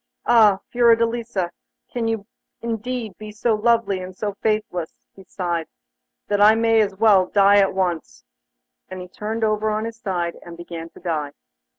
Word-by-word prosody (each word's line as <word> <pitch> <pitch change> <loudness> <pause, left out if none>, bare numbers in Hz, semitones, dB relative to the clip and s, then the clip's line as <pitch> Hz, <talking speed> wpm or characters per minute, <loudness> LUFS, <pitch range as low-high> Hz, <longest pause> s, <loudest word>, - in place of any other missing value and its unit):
'Ah! 215 -5 +5
Fiordelisa, 230 -5 +2 0.4
can 235 -2 -1
you 225 -3 -2 0.3
indeed 230 -2 -4
be 215 0 -8
so 220 +2 0
lovely 225 -2 +1
and 185 0 -9
so 205 0 -3
faithless?' 210 -6 -2 0.2
he 195 - -15
sighed, 175 -3 -3 0.6
'then 205 0 +1
I 215 +1 +7
may 225 0 +3
as 200 -2 -1
well 200 -3 +4
die 200 +1 +5
at 195 -1 +2
once!' 170 - -2 0.7
And 185 0 -7
he 180 - -8
turned 215 +4 -4
over 215 0 +1
on 215 +1 -1
his 230 0 -6
side 175 -6 -3
and 170 -1 -11
began 170 -1 -8
to - - -16
die. 155 -5 -3
205 Hz, 165 wpm, -22 LUFS, 185-225 Hz, 0.7 s, I